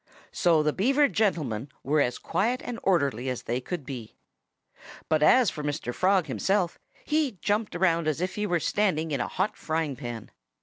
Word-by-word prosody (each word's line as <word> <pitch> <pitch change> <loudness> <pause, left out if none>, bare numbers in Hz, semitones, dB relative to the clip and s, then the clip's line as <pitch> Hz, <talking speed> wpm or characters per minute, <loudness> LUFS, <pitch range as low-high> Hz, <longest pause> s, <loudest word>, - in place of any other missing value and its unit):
So 165 -3 +3
the 150 -1 +1
Beaver 275 +8 +3
gentlemen 155 - -1
were 145 +2 +2
as 125 -2 0
quiet 230 +9 -1
and 240 -1 -5
orderly 140 - +1
as 125 - -4
they 120 +2 -2
could 160 +1 -5
be. 125 -6 -7 0.9
But 155 -1 +2
as 240 +8 +5
for 150 - -6
Mr. 145 -4 -3
Frog 185 +1 +2
himself, 190 -3 0 0.3
he 300 -4 +1
jumped 205 -1 -1
around 170 -3 +2
as 155 -1 0
if 180 +1 -2
he 210 0 -2
were 175 -3 +1
standing 165 -4 0
in 140 -4 0
a - - -1
hot 190 +5 -1
frying 160 -3 -2
pan. 120 -4 -7
165 Hz, 180 wpm, -27 LUFS, 140-200 Hz, 0.9 s, as